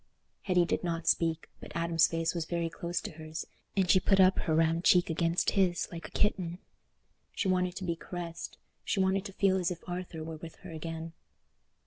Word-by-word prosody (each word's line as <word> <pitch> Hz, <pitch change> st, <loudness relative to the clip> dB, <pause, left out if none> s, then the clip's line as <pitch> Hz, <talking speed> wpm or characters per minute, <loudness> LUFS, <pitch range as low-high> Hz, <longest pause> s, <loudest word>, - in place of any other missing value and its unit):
Hetty 180 Hz, -2 st, +3 dB
did -, -, -1 dB
not 165 Hz, -1 st, -2 dB
speak, 165 Hz, -1 st, +2 dB
but -, -, -10 dB
Adam's 170 Hz, -1 st, +3 dB
face 165 Hz, 0 st, -1 dB
was 170 Hz, -2 st, -2 dB
very 170 Hz, 0 st, -1 dB
close 170 Hz, 0 st, -3 dB
to -, -, -6 dB
hers, 155 Hz, 0 st, -6 dB, 0.3 s
and 190 Hz, -2 st, +3 dB
she 185 Hz, -, +6 dB
put 195 Hz, +1 st, +3 dB
up 185 Hz, 0 st, +6 dB
her 160 Hz, -, 0 dB
round 165 Hz, +1 st, +2 dB
cheek 180 Hz, -2 st, +5 dB
against 165 Hz, +1 st, +1 dB
his, 185 Hz, -3 st, +2 dB
like 170 Hz, -2 st, -7 dB
a -, -, -18 dB
kitten. 180 Hz, -5 st, 0 dB, 0.8 s
She 200 Hz, -, -1 dB
wanted 180 Hz, -1 st, +1 dB
to 195 Hz, -, -5 dB
be 170 Hz, -2 st, -1 dB
caressed—she 170 Hz, +3 st, -6 dB
wanted 190 Hz, +1 st, +2 dB
to 195 Hz, -, -7 dB
feel 190 Hz, -1 st, +3 dB
as 180 Hz, 0 st, +1 dB
if 175 Hz, -2 st, -7 dB
Arthur 175 Hz, -3 st, -5 dB
were 160 Hz, 0 st, -6 dB
with 165 Hz, +1 st, -9 dB
her 180 Hz, -, -7 dB
again. 165 Hz, +1 st, -6 dB
170 Hz, 195 wpm, -31 LUFS, 165-185 Hz, 0.8 s, she